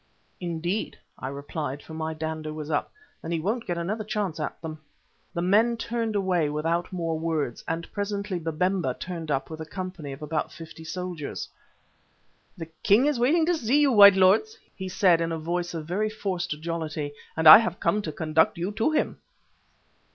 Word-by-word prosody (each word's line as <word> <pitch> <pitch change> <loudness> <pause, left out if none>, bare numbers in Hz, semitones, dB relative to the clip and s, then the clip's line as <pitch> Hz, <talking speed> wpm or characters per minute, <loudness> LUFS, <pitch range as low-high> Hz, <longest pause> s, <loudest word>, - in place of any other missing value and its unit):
"Indeed," 175 +3 -3 0.2
I 130 - -4
replied, 140 +1 -5
for 160 - -11
my 160 0 -3
dander 155 0 -4
was 155 0 -6
up. 145 - -1 0.3
"Then 165 - -6
he 165 - 0
won't 220 +8 -2
get 175 -2 -1
another 200 +6 -2
chance 205 -6 -2
at 150 - -4
them." 155 -1 -7 0.6
The 170 - -1
men 220 +6 +3
turned 230 -1 -2
away 180 -6 +1
without 165 +3 -1
more 165 -3 -2
words, 155 -7 -2
and 165 +1 -3
presently 200 -2 -2
Babemba 165 -3 0
turned 170 -3 -6
up 135 +1 -1
with 160 0 -6
a - - -5
company 185 -5 -6
of 135 +3 -8
about 155 +1 -2
fifty 160 0 -11
soldiers. 165 -1 -5 1.1
"The 165 - -5 0.2
king 215 +6 +5
is 295 -4 +1
waiting 310 +7 +3
to 350 - +2
see 280 -3 +2
you, 290 -2 +4
white 200 -4 +9
lords," 200 - +4 0.2
he 190 -2 -5
said 180 -2 +4
in 165 0 -1
a 165 - -2
voice 175 +2 -3
of 160 -2 -4
very 200 +6 -1
forced 180 -7 -3
jollity, 155 -3 -4 0.2
"and 160 0 +3
I 155 +6 +13
have 230 - -2
come 210 - +1
to 160 - -4
conduct 160 +1 +1
you 175 +4 -2
to 220 +6 +1
him." 310 - -1
170 Hz, 185 wpm, -26 LUFS, 160-205 Hz, 1.1 s, I